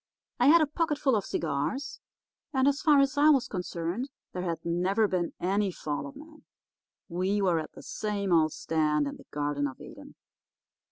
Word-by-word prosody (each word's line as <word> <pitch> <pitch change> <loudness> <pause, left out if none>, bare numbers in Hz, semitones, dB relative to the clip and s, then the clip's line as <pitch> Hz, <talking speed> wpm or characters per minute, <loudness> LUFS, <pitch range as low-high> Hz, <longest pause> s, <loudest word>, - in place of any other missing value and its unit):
I 245 - +4
had 330 +3 +7
a - - +5
pocketful 295 -4 0
of 205 - -1
cigars, 170 - -2 0.6
and 265 +1 +3
as 285 0 +2
far 295 -3 +5
as 275 +1 +1
I 300 +1 +6
was 275 -5 +4
concerned 180 +6 -3 0.2
there 180 - -3
had 170 -3 -3
never 185 +6 +2
been 180 -3 -1
any 195 +2 +1
fall 145 -4 -4
of 140 - -11
man. 310 0 -14 0.6
We 185 +3 0
were 180 -4 +2
at 155 - -7
the - - -12
same 200 -3 -2
old 155 -2 +4
stand 150 -2 0
in 140 - -5
the - - -16
Garden 145 -1 -1
of 130 - -9
Eden. - - -12
190 Hz, 180 wpm, -28 LUFS, 165-270 Hz, 0.6 s, had